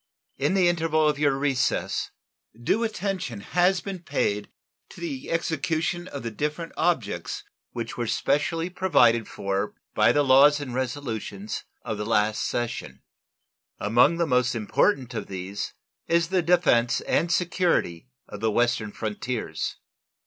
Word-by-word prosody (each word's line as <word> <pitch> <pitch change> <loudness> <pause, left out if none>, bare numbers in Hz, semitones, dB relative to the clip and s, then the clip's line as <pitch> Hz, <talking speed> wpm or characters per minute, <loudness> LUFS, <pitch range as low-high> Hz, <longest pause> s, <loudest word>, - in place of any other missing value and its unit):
In 190 - +1
the 185 -2 +4
interval 160 -2 +2
of 150 -1 +1
your 145 -2 +2
recess 135 -2 0 0.5
due 205 - +1
attention 195 - -3
has 180 - +2
been 195 -2 -5
paid 105 -10 -1 0.4
to - - -13
the 280 -6 -5
execution 165 +2 -1
of 140 -6 -7
the 115 - -3
different 150 +8 -3
objects 125 - -1 0.3
which 115 -1 -5
were 120 -1 -2
specially 165 +7 0
provided 125 - +3
for 100 +1 -3 0.2
by - - +4
the 145 - +3
laws 140 +2 +6
and 135 -4 -6
resolutions 120 -6 -4 0.2
of 110 -2 -4
the 105 - -2
last 110 -1 +2
session. 120 - -3 0.7
Among 120 +10 +4
the 170 - +2
most 125 -4 +2
important 125 - +1
of 115 - -4
these 95 +1 -5 0.3
is 170 0 +2
the 185 -1 +2
defense 165 -9 +3
and 170 +1 +1
security 170 - 0 0.2
of - - -8
the 110 - +1
western 120 -1 +1
frontiers. 110 -5 -3
135 Hz, 140 wpm, -26 LUFS, 115-170 Hz, 0.7 s, laws